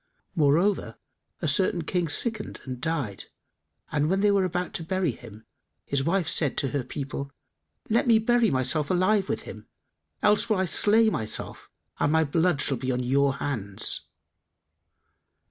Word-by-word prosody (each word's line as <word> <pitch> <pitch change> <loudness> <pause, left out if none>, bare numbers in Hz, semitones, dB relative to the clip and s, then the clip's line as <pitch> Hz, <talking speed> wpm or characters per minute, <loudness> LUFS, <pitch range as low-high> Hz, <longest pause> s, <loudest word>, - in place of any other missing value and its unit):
Moreover, 155 - +1 0.5
a - - +1
certain 170 +3 +2
King 170 +1 -1
sickened 220 +6 0
and 130 -2 -6
died, 145 - -3 0.7
and 150 0 0
when 190 +2 +1
they 205 0 +4
were 195 -2 +2
about 180 0 -3
to 165 - -4
bury 185 -2 0
him, 110 -2 -13 0.4
his 140 -1 -1
wife 175 +2 0
said 150 -4 +1
to 135 - 0
her 140 -1 -2
people: 140 +1 -6 0.6
'Let 230 +3 +1
me 230 -2 +6
bury 235 0 +2
myself 135 +2 +1
alive 190 +2 +2
with - - -2
him: - - -10 0.6
else 210 +2 +3
will 215 - +2
I 190 - +1
slay 220 +4 +4
myself 110 - -4 0.3
and 145 - +2
my 160 0 +3
blood 160 +1 +1
shall 135 - 0
be 130 +2 -2
on 125 0 -1
your 140 +2 +2
heads. 105 -9 -2
160 Hz, 160 wpm, -26 LUFS, 135-190 Hz, 0.7 s, me